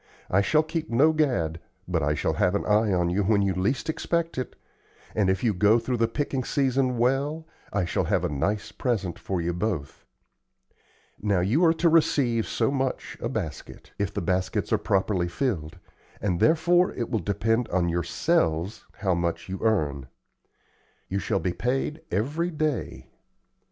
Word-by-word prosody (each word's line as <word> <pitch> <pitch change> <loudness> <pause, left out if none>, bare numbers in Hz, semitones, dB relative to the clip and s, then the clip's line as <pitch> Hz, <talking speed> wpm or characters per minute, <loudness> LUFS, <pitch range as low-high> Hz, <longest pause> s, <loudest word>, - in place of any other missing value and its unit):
I 100 - +4
shall 155 +10 +3
keep 160 0 -4
no 145 +7 +4
gad, 120 - 0 0.3
but - - 0
I 75 +1 +1
shall - - 0
have 90 +2 +1
an - - -1
eye 105 0 +3
on 90 -2 +1
you 95 +3 +1
when 100 0 +3
you 95 -1 +1
least 100 +9 -1
expect 165 +1 -1
it; 130 - -5 0.6
and 100 -3 +2
if 95 0 0
you 115 -3 +3
go 105 +4 +4
through 120 +2 -2
the 115 0 +2
picking 135 +1 -2
season 130 -2 +1
well, 140 +6 0 0.3
I 100 -3 0
shall 85 - -1
have - - +1
a - - +2
nice 100 +9 -2
present 105 -8 -2
for 95 -2 -2
you 85 +1 -1
both. 85 -6 -3 1.2
Now, 100 -3 +2
you 115 - +2
are 165 - +5
to 170 - +2
receive 145 -8 +3
so - - 0
much 135 -2 -2
a - - -2
basket, - - -6
if 100 -1 0
the - - -3
baskets 95 +2 0
are - - +3
properly 95 -2 +1
filled, 85 - -2 0.4
and 90 -4 -1
therefore 175 +3 +4
it 120 - -3
will 110 - +1
depend 115 +5 0
on 90 -1 +1
yourselves 85 +2 0
how 95 -3 0
much 85 +1 -2
you 95 - -4
earn. 75 - 0 1.0
You 100 - -1
shall 100 - 0
be 90 -2 -1
paid 135 - -1
every 150 - -1
day. 155 -5 -2
110 Hz, 170 wpm, -26 LUFS, 90-135 Hz, 1.2 s, are